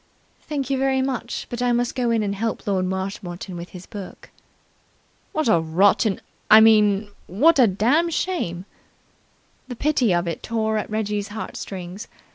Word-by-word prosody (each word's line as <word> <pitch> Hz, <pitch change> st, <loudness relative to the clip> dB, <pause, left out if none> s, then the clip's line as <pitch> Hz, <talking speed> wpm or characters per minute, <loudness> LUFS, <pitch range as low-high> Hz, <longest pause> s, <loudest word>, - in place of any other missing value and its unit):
"Thank 280 Hz, -3 st, -4 dB
you 270 Hz, -, +1 dB
very 265 Hz, 0 st, +1 dB
much, 255 Hz, -3 st, -3 dB
but 240 Hz, 0 st, -4 dB
I 245 Hz, 0 st, +2 dB
must 240 Hz, 0 st, 0 dB
go 250 Hz, -2 st, 0 dB
in 225 Hz, -2 st, +1 dB
and 200 Hz, -1 st, -1 dB
help 225 Hz, +3 st, -3 dB
Lord 190 Hz, -2 st, 0 dB
Marshmoreton 190 Hz, -1 st, -5 dB
with 170 Hz, +1 st, -7 dB
his 180 Hz, -1 st, -11 dB
book." 200 Hz, -4 st, -10 dB, 1.0 s
"What 310 Hz, -4 st, -1 dB
a 170 Hz, -7 st, +4 dB
rotten 190 Hz, +5 st, +2 dB, 0.3 s
I 215 Hz, -, +10 dB
mean, 210 Hz, -2 st, +4 dB, 0.2 s
what 285 Hz, -, +3 dB
a 245 Hz, -, +7 dB
dam' 245 Hz, -, +2 dB
shame!" 305 Hz, -, -2 dB, 1.0 s
The 250 Hz, -, -6 dB
pity 260 Hz, -5 st, +1 dB
of 175 Hz, 0 st, +1 dB
it 165 Hz, -, -4 dB
tore 220 Hz, -1 st, -1 dB
at -, -, -5 dB
Reggie's 210 Hz, -1 st, -2 dB
heart 215 Hz, +1 st, -7 dB
strings. 185 Hz, +1 st, -7 dB
215 Hz, 165 wpm, -22 LUFS, 190-245 Hz, 1.0 s, I